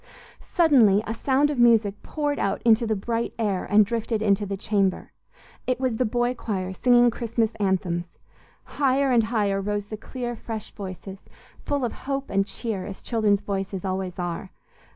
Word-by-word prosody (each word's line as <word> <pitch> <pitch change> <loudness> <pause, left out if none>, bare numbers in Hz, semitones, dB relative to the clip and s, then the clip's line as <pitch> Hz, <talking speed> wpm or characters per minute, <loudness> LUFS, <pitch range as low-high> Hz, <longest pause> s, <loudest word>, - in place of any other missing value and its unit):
Suddenly 245 - +5
a 225 - -3
sound 275 +5 +2
of 280 - -3
music 225 -4 +4
poured 290 -2 -2
out 195 0 0
into 230 0 +4
the 220 - +1
bright 230 +3 -2
air 205 -5 -1
and 210 0 +5
drifted 225 0 -2
into 205 -1 +2
the 195 0 -3
chamber. 200 -2 0 0.6
It 255 0 0
was 255 -4 0
the 255 - +1
boy 240 +2 0
choir 190 -6 -4
singing 245 +3 +4
Christmas 230 -1 -1
anthems. 185 -3 0 0.6
Higher 275 -1 +1
and 235 -3 +4
higher 205 -4 0
rose 205 0 -2
the 215 +1 -7
clear, 240 +2 -5
fresh 220 -2 -6
voices, 190 -1 -8 0.4
full 285 -3 -1
of 235 - -3 0.2
hope 275 0 -2
and 195 0 +1
cheer, 215 -6 -4
as 195 - -9
children's 210 -4 +1
voices 195 -1 -4
always 185 -1 -3
are. 175 +1 -4
215 Hz, 170 wpm, -25 LUFS, 195-240 Hz, 0.6 s, Suddenly